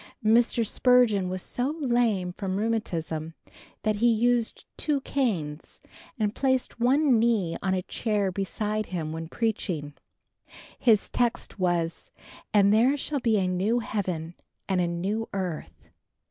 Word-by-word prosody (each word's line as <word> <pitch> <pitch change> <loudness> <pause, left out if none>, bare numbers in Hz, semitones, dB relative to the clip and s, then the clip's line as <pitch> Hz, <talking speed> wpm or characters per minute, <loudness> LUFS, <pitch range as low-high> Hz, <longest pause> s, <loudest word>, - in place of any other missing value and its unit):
Mr. 230 +1 +3
Spurgeon 220 -5 +3
was 185 0 -4
so 265 +5 -2
lame 235 - +1
from 190 -1 -3
rheumatism 165 -8 -2 0.5
that 215 -1 +1
he 235 +2 +4
used 235 +1 +1
two 295 -3 0
canes 175 - -2 0.4
and 210 -2 0
placed 260 -2 0
one 260 0 +4
knee 220 -8 +1
on 190 -1 +1
a 185 - -2
chair 205 -3 -1
beside 210 +3 -2
him, 165 -4 -4
when 160 0 -5
preaching. 175 -8 -2 0.9
His 220 -5 +4
text 240 -3 -1
was 175 -2 -1 0.4
"And 200 -1 +5
there 250 +6 +4
shall 285 +1 -2
be 230 -3 +2
a 190 - +1
new 190 +6 +1
heaven 180 -8 -3 0.3
and 190 -2 +1
a 175 - +1
new 195 +6 -2
earth." 185 -5 -5
210 Hz, 135 wpm, -27 LUFS, 180-235 Hz, 0.9 s, And